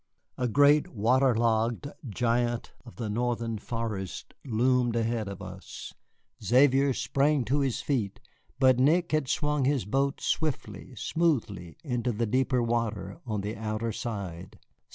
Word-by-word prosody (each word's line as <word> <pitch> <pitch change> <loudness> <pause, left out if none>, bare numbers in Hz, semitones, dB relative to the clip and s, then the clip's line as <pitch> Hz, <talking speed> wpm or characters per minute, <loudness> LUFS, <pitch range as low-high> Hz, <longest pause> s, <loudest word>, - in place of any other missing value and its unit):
A 125 - -1
great 145 +5 +5
water 125 +3 +2
logged 115 +2 +1 0.2
giant 120 +2 0
of 120 - -12
the 115 - -4
Northern 115 0 -1
forests 110 -5 -4 0.2
loomed 125 0 +2
ahead 115 -2 0
of 100 -1 -7
us. - - -9 0.5
Xavier 135 +2 +4
sprang 135 +2 +1
to 135 +6 +1
his 135 -4 0
feet, 120 -5 -1 0.4
but 130 -2 +5
Nick 170 +6 +3
had 155 -3 +1
swung 150 -2 0
his 135 -6 +1
boat 135 +6 0
swiftly, 130 -6 -2
smoothly, 110 - -1
into 125 -4 -1
the 115 +1 -1
deeper 125 +2 +1
water 115 -4 -2
on 105 -3 -1
the 105 +2 -4
outer 110 +1 -2
side. 100 -7 -6
120 Hz, 135 wpm, -28 LUFS, 110-135 Hz, 0.5 s, great